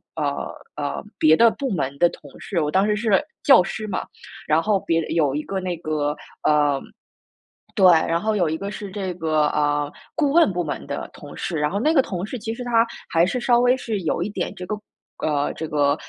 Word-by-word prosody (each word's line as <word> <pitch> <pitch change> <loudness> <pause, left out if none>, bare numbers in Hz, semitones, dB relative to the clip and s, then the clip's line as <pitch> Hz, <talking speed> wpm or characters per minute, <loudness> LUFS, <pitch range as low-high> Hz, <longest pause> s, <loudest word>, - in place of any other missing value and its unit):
呃， 145 -3 -2 0.2
呃， 145 +3 -3
别 155 0 +6
的 230 +4 +6
部 270 -1 -3
门 140 -5 -2
的 175 - +5
同 145 - -13
事， 180 -5 -2
我 150 - 0
当 190 +5 +3
时 210 0 +1
是 215 -2 +3 0.2
教 270 - +7
师 215 +4 -5
嘛， 190 - -3 0.4
然 155 +2 +3
后 205 -1 +2
别 165 0 +1
的 - - -5
有 150 -5 +2
一 150 - -1
个 195 -1 -3
那 185 -1 -3
个 150 -2 -1 0.3
呃， 145 -2 +3 1.0
对， 190 - +4
然 165 +1 +3
后 220 0 0
有 175 -6 +2
一 160 - -2
个 200 +2 -5
是 205 -2 -7
这 190 -2 -3
个， 155 -3 +1
呃， 145 -1 +1 0.3
顾 290 -4 +2
问 335 -10 +5
部 175 -1 -1
门 145 - -4
的 - - -5
同 - - -11
事。 170 - -3
然 150 +1 0
后 200 - -1
那 310 +7 +2
个 275 - +6
同 185 -7 -4
事 250 +4 -5
其 225 +1 -4
实 250 - -8
他， 235 -1 +3 0.2
还 165 0 +4
是 220 +7 -1
稍 240 0 +3
微 245 +1 +4
是 220 -5 -3
有 165 0 -1
一 195 - -1
点 190 -3 -3
这 180 - -7
个 210 - -2 0.5
呃， 145 -2 0
这 160 - -5
个， 145 -1 +2
180 Hz, 240 characters per minute, -23 LUFS, 150-215 Hz, 1.0 s, 教